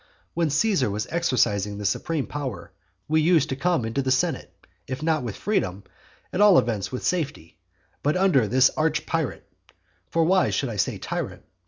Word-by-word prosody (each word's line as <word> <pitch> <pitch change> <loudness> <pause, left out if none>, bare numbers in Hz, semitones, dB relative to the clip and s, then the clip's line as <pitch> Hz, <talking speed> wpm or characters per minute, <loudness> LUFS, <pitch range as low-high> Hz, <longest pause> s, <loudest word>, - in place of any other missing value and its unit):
When 165 -2 +1
Caesar 155 - +2
was 105 +2 -2
exercising 110 - +1
the 105 - -5
supreme 145 +8 -1
power, 125 -13 -6 0.4
we 155 +1 +2
used 165 0 +3
to 130 - -1
come 165 -2 0
into 115 +5 -1
the 135 - -2
senate, 135 +2 0 0.4
if 130 +3 -5
not 160 -1 +1
with 120 -5 -5
freedom, 100 - -1 0.5
at 185 - 0
all 205 -3 +7
events 100 -5 0
with 125 - -5
safety. 150 - -3 0.4
But 150 +4 +1
under 180 - +3
this 130 +4 +4
arch 155 -1 0
pirate, 165 -5 -3 0.6
(for 165 - +2
why 185 +3 +3
should 135 - -1
I 110 - -5
say 100 - 0
tyrant?) - - -5
140 Hz, 175 wpm, -24 LUFS, 115-165 Hz, 0.6 s, all